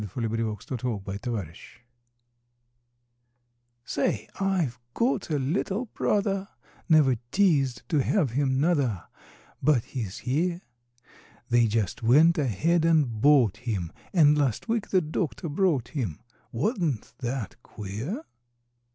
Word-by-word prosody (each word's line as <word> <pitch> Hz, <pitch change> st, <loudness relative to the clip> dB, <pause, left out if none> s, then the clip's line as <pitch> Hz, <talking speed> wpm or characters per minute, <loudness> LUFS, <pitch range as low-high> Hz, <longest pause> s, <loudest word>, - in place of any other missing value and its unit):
HIS 105 Hz, -4 st, -8 dB
NEW 115 Hz, -2 st, -1 dB, 0.5 s
BROTHER 100 Hz, -4 st, -4 dB, 2.3 s
Say, 105 Hz, +1 st, -1 dB
I've 180 Hz, -11 st, 0 dB, 0.2 s
got 235 Hz, -6 st, 0 dB
a 150 Hz, -, +1 dB
little 190 Hz, -, -1 dB
brother, 195 Hz, -1 st, 0 dB, 0.4 s
Never 145 Hz, -6 st, +5 dB
teased 145 Hz, -11 st, +2 dB
to 150 Hz, -4 st, +3 dB
have 150 Hz, -, +1 dB
him, 130 Hz, +1 st, +1 dB
nuther, 140 Hz, -, +1 dB, 0.6 s
But 135 Hz, -4 st, +3 dB
he's 110 Hz, -7 st, -5 dB
here; 170 Hz, +7 st, 0 dB, 0.9 s
They 120 Hz, -1 st, +4 dB
just 110 Hz, -2 st, -1 dB
went 155 Hz, +9 st, +5 dB
ahead 155 Hz, -, +1 dB
and 150 Hz, -10 st, +2 dB
bought 135 Hz, -8 st, +5 dB
him, 105 Hz, -9 st, -3 dB, 0.2 s
And, 150 Hz, -5 st, +5 dB
last 140 Hz, -, 0 dB
week 225 Hz, -2 st, -1 dB
the 185 Hz, -, +3 dB
doctor 155 Hz, -, -3 dB
brought 150 Hz, -, +1 dB
him, 110 Hz, -, -3 dB, 0.3 s
Wa'n't 155 Hz, -, -1 dB
that 120 Hz, -2 st, -4 dB
queer? 115 Hz, -, -6 dB
135 Hz, 110 wpm, -27 LUFS, 115-170 Hz, 2.3 s, Never